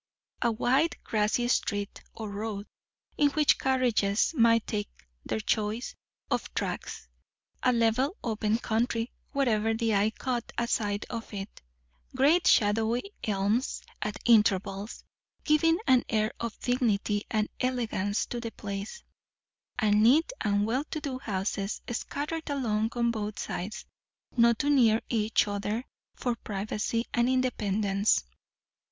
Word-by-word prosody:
A 235 - +3
wide 265 +8 +2
grassy 220 +3 +1
street, 205 -4 -1
or 220 - -5
road, 205 0 -4 0.5
in 290 -1 +5
which 305 -2 +4
carriages 245 -4 +2
might 230 -5 +4
take 205 -1 -3 0.3
their - - -2
choice 215 +2 -1 0.4
of - - -1
tracks; - - -4 0.5
a 255 - +4
level 245 - +2
open 220 -1 0
country 230 +1 -1 0.2
wherever 225 -6 +1
the 225 -1 0
eye 205 +1 +3
caught 245 +1 -3
a 235 - 0
sight 205 -3 -1
of 230 -1 -5
it; 195 +1 -7 0.5
great 315 +6 +4
shadowy 225 - +3
elms 210 +4 0 0.2
at 210 0 -2
intervals, 205 -2 +2 0.4
giving 325 +2 +4
an 255 -1 +5
air 215 -1 +1
of 230 -1 -4
dignity 215 -4 +1
and 215 -1 0
elegance 230 -5 0
to 240 - -4
the 230 -1 -4
place; 200 - -6 0.7
and 210 -1 +3
neat 300 - +4
and 205 0 +2
well 250 +6 0
to 310 - -4
do 275 -4 -4
houses 200 -2 -2
scattered 300 +6 -4
along 225 -6 0
on 235 -1 +1
both 215 -2 -4
sides, 215 +6 -5 0.5
not 235 -1 +5
too 290 +5 +1
near 230 -6 +5
each 220 -2 +2
other 205 +4 -2 0.3
for 245 - -1
privacy 210 +3 -2
and 240 +1 +2
independence. 210 - +1
225 Hz, 130 wpm, -28 LUFS, 210-250 Hz, 0.7 s, in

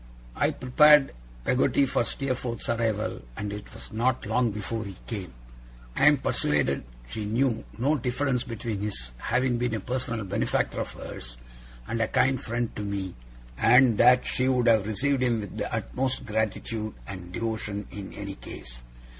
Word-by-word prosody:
I - - +2
prepared 145 +2 +5 0.3
Peggotty 130 - +3
for 125 - +1
Steerforth's 130 -2 -3
arrival 115 -2 0 0.2
and 100 0 -3
it 105 0 -8
was - - -11
not 125 +3 +1
long 115 +3 +2
before 110 +2 -3
he 95 -3 -8
came. 100 -6 -5 0.6
I - - +5
am - - +7
persuaded 70 -3 +1 0.2
she 105 - -4
knew 115 +2 +1
no 140 +6 +2
difference 125 +1 0
between 115 -2 -4
his 80 -13 -4
having 125 - +1
been 120 -2 0
a - - -2
personal 115 -1 -2
benefactor 100 +1 0
of - - -5
hers, - - -8 0.5
and 115 - -1
a 115 - +2
kind 135 -1 +2
friend 120 0 -2
to - - -3
me, 100 -3 -3 0.5
and 125 -4 +6
that 125 +1 +6
she 130 - 0
would 125 -2 +2
have 110 -3 +5
received 135 +5 +1
him 120 -3 +2
with 100 - -8
the - - -3
utmost 130 0 -2
gratitude 110 0 -2
and 90 -3 -8
devotion 110 -2 -3
in 100 0 -7
any 100 -1 -5
case. - - -9
115 Hz, 165 wpm, -27 LUFS, 105-125 Hz, 0.6 s, am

